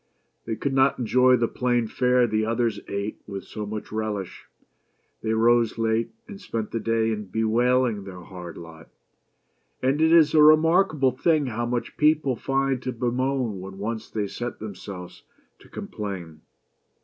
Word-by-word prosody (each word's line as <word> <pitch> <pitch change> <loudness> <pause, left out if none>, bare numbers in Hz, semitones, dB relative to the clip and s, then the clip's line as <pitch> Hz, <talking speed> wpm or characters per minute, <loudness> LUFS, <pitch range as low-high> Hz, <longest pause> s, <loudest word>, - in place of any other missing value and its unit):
They 115 - -2
could 140 +4 -2
not 135 +1 +3
enjoy 125 +1 +4
the 120 -1 +1
plain 120 -1 0
fare 125 +2 +2
the 110 -1 0
others' 115 0 0
ate 100 +1 -4
with 100 -1 -6
so 105 -1 -6
much 105 0 -6
relish. 105 -3 -4 0.8
They 110 0 -1
rose 115 0 +3
late, 115 0 0 0.2
and 200 -2 -10
spent 115 - -4
the 115 - -2
day 115 0 +1
in 105 -1 -3
bewailing 115 +2 +1
their 95 -2 -9
hard 90 -2 -9
lot; 80 -1 -12 0.9
and 135 +4 +1
it 160 0 +4
is 160 -3 +6
a 155 - +6
remarkable 155 -2 +5
thing 150 +3 +1
how 120 -1 -2
much 120 0 -3
people 150 -3 +3
find 135 +1 0
to 130 - -3
bemoan 125 -2 -1
when 95 +1 -9
once 110 +2 -4
they 105 -2 -2
set 120 +4 -5
themselves 95 -3 -8 0.4
to - - -19
complain. 90 -7 -7
115 Hz, 160 wpm, -25 LUFS, 105-130 Hz, 0.9 s, is